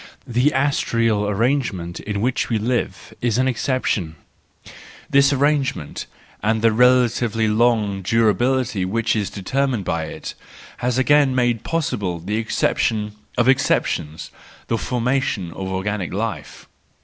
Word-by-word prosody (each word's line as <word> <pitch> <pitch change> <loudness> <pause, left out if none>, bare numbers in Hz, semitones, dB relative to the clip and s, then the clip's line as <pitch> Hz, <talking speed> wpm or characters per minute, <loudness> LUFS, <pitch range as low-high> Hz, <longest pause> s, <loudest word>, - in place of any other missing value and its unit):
The 125 +5 +2
astral 115 -6 +1
arrange¬ 120 +5 +1
ment 85 -1 -6
in 100 -1 -4
which 125 +2 0
we 115 - +1
live 120 +3 -2
is 120 -2 +1
an 130 +1 +2
exception; 120 - -1 0.9
this 140 0 +4
arrangement, 140 - 0 0.3
and 110 +2 0
the 115 - +5
relatively 120 -2 +3
long 105 -3 +2
durability 115 +2 +1
which 115 +5 0
is 105 -3 -1
determined 125 +1 -1
by 80 -1 -1
it, - - -7 0.4
has 125 0 -1
again 140 0 +4
made 120 -3 +1
possible 105 - -2
the 100 +6 -3
exception 110 -1 0 0.3
of 125 - +3
exceptions, 80 - +1 0.4
the 115 - +1
formation 125 -7 -1
of 95 +2 -6
organic 95 0 -2
life. 110 +3 -5
115 Hz, 125 wpm, -21 LUFS, 105-130 Hz, 0.9 s, the